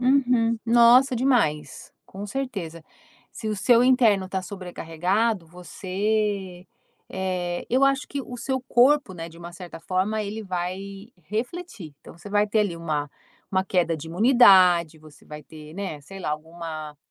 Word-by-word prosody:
Uhum, 245 -3 +2
nossa 240 +3 +5
demais, 185 - 0
com 200 +2 -8
certeza, 195 -10 -5 0.5
se 220 - -6
o 215 - -1
seu 235 +5 +4
interno 230 -7 +4
está 190 0 -3
sobrecarregado 185 +2 -2
você 190 +2 -3 0.4
eh, 180 -2 -3
eu 260 +3 +3
acho 275 +1 +1
que 280 -1 -4
o 245 - -9
seu 260 +2 -2
corpo 260 -3 +3
né, 165 -1 -7
de 165 - -16
uma 170 0 -10
certa 175 -2 -10
forma 190 +5 -1
ele 215 +2 -5
vai 195 +3 -5 0.2
refletir, 225 - -5
então - - -14
você 200 +4 -11
vai 205 0 +2
ter, 215 +1 +2
ali, 185 -5 -1
uma 150 -4 -3 0.4
uma 190 0 +2
queda 175 -3 +1
de 155 +2 -9
imunidade, 180 - +5
você 155 -1 -17
vai 150 0 -9
ter, 155 +1 -13
né, 190 -7 -5
sei 195 +7 -11
lá, 150 - -3
alguma 155 -1 -7
190 Hz, 155 wpm, -24 LUFS, 170-230 Hz, 0.5 s, nossa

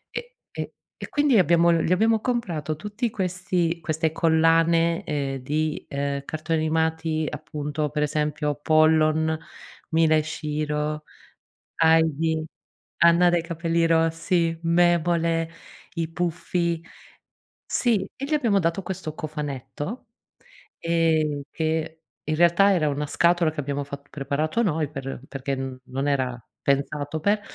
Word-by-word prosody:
Ehm, - - -2 0.3
ehm, - - -5 0.3
e - - -7
quindi 290 -6 +3
abbiamo 170 0 +4
gli 165 0 +1
abbiamo 220 +4 +3
comprato 175 - -2
tutti 210 +7 -3
questi 180 -3 -1
queste 160 -1 0
collane, 165 +1 +3
ehm, 140 -3 -2
di, 150 +4 -2
ehm, 140 0 -2
cartoni 160 +2 -2
animati, 160 0 0
appunto, 150 0 -4
per 150 +1 -1
esempio: 150 0 -1
Pollon, 155 0 +3 0.5
Mila 160 -1 +4
e 155 - +2
Shiro, 150 0 -3 0.7
Heidi, 160 -1 +3 0.5
Anna 170 +1 +6
dai 175 -1 +1
capelli 170 0 0
rossi, 165 +1 +1
Memole, 170 -1 +2 0.4
I 165 -2 -2
puffi 170 0 -1 0.8
sì, 220 -6 +1
e 275 - -5
gli 295 - -3
abbiamo 235 -9 +3
dato 170 +2 0
questo 170 -5 -5
cofanetto, 150 - -5 0.7
ehm, 160 -3 +1
che 160 0 -2 0.2
in 155 0 -1
realtà 175 +4 +5
era 160 -5 +2
una 145 +1 -2
scatola 170 +1 +3
che 155 - -16
abbiamo 145 0 -3
fatt 140 0 -9
preparato 155 +9 -1
noi 160 -7 0
per 135 -3 -6
perché 135 0 -3 0.3
non 135 +2 -3
era 130 -3 0 0.2
pensato 145 +2 0
per 205 +5 +2
160 Hz, 125 wpm, -24 LUFS, 150-170 Hz, 0.8 s, Anna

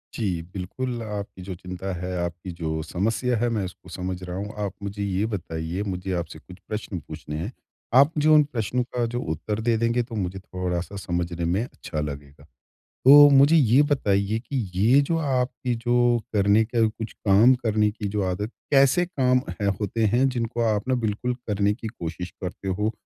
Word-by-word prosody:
जी। 95 -7 -1
बिल्कुल, 120 +6 -4
आपकी 100 -3 -6
जो 95 - -3
चिंता 90 +1 -6
है, 90 +1 -4
आपकी 85 +1 -4
जो 80 -1 -2
समस्या 110 +9 0
है, 120 +2 +1
मैं 110 -4 -1
उसको 90 0 -11
समझ 90 0 -4
रहा 90 0 -5
हूँ 105 +2 -5
आप 100 - -4
मुझे 100 0 -4
ये 100 +1 0
बताइए 80 0 -3
मुझे 90 +1 -4
आपसे 80 -1 -10
कुछ 90 +3 -14
प्रश्न 105 -3 -4
पूछने 75 0 -8
हैं। 85 +9 -4 0.4
आप 140 +4 +7
जो 155 0 +6
उन 150 -1 +7
प्रश्नों 125 -3 -2
का 120 -1 -2
जो 120 - -1
उत्तर 105 +7 -4
दे 115 0 +2
देंगे 115 +1 +1
तो 115 -1 -9
मुझे 95 -2 -3
थोड़ा-सा 90 0 -4
समझने 85 -2 -2
में 90 +6 +1
अच्छा 105 - -6
लगेगा। 70 -1 -7 0.6
तो 145 +2 +10
मुझे 140 +3 +6
ये 135 -3 +5
बताइए 105 -5 +1
कि 130 +4 -7 0.2
ये 115 +9 +5
जो 165 - +2
आपकी 130 -4 -1
जो 120 0 +3 0.2
करने 100 +1 +4
का 115 0 +2
कुछ 110 0 -6
काम 110 +5 +5
करने 105 -2 +2
की 105 -1 -5
जो 105 - +1
आदत 105 +6 -3 0.2
कैसे 140 +5 +5
काम 130 -7 +2 0.2
हैं 100 - +1
होते 110 +2 -1
हैं 130 +2 +4
जिनको 120 -1 -2
आप 105 +4 -3
ना 130 - +2
बिल्कुल 110 +4 -1
करने 105 -1 +1
की 115 0 -7
कोशिश 90 -4 -6
करते 90 +1 -6
हो 105 +4 0
105 Hz, 185 wpm, -25 LUFS, 90-120 Hz, 0.6 s, तो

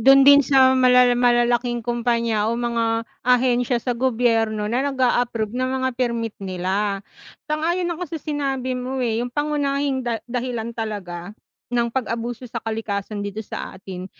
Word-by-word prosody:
Do'n 270 +4 +7
din 285 0 +8
sa 260 -1 +5
malala 250 -1 +5
malalaking 240 0 +2
kompanya 235 -2 0
o 235 - 0
mga 230 -1 0 0.2
ahensya 245 -1 +3
sa 245 +1 -2
gobyerno, 225 -4 +1
na 250 +4 0
nag-a-approve 245 -4 0
ng 255 0 0
mga 260 - +1
permit 235 -3 -1
nila. 195 +2 -1 0.5
Sang-ayon 340 +4 0
ako 350 +2 -3
sa 325 - -3
sinabi 270 -4 -2
mo, 255 +1 -4
eh, 230 -2 0
'yung 245 - -4
pangunahing 285 -2 0
da 230 -2 -1
dahilan 235 -2 -3
talaga 200 -4 -5 0.4
ng 235 -1 +1
pag-abuso 235 0 -3
sa 230 -1 -6
kalikasan 215 -2 -3
dito 205 +2 -5
sa - - -7
atin, 185 -1 -8
240 Hz, 150 wpm, -22 LUFS, 225-260 Hz, 0.5 s, din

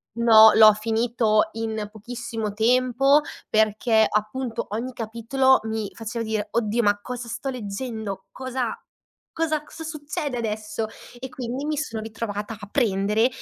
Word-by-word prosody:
No, 220 -2 +8
l'ho 215 -1 +8
finito 220 0 +1
in 220 -2 -3
pochissimo 225 -1 -5
tempo 255 +5 +3 0.3
perché, 220 +1 +3
appunto, 225 +3 -2
ogni 235 +5 -4
capitolo 235 +4 +2
mi 220 -2 -3
faceva 230 +1 -4
dire: 215 -1 -2
“Oddio, 230 0 +1
ma 205 -1 +2
cosa 245 0 -6
sto 270 +4 -4
leggendo? 220 -3 -5
Cosa, 260 - -3 0.5
cosa, 315 -2 -1
cosa 320 - -10
succede 300 -3 -4
adesso?” 215 -1 -3 0.3
E 260 +1 -6
quindi 255 +2 -5
mi 305 -1 -1
sono 230 -7 -3
ritrovata 215 -1 -5
a 205 - -9
prendere 210 -1 +2
225 Hz, 135 wpm, -24 LUFS, 215-255 Hz, 0.5 s, No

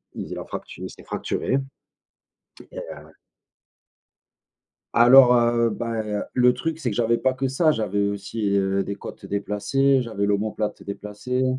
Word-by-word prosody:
la - - -6
fractu - - -7
s'est - - -14
fracturé. 135 - -2 1.1
Et - - -9
heu - - -9 1.8
Alors, 125 +1 +8
heu, 120 0 +3
bah 115 0 -3
et 105 -1 -6
heu, 105 - -1
le 125 0 +4
truc, 160 +6 -3
c'est 155 - -2
que 100 - -4
j'avais 115 0 +2
pas 130 0 +1
que 135 +1 -1
ça, 155 +4 +2
j'avais 100 -4 0
aussi, 100 +1 -2
heu, 95 0 +1
des 100 - -4
côtes - - -9
déplacées, 130 +7 +1
j'avais 110 -5 -3
l'omoplate 105 +1 -1
déplacée. 105 +6 -3
115 Hz, 145 wpm, -23 LUFS, 100-125 Hz, 1.8 s, Alors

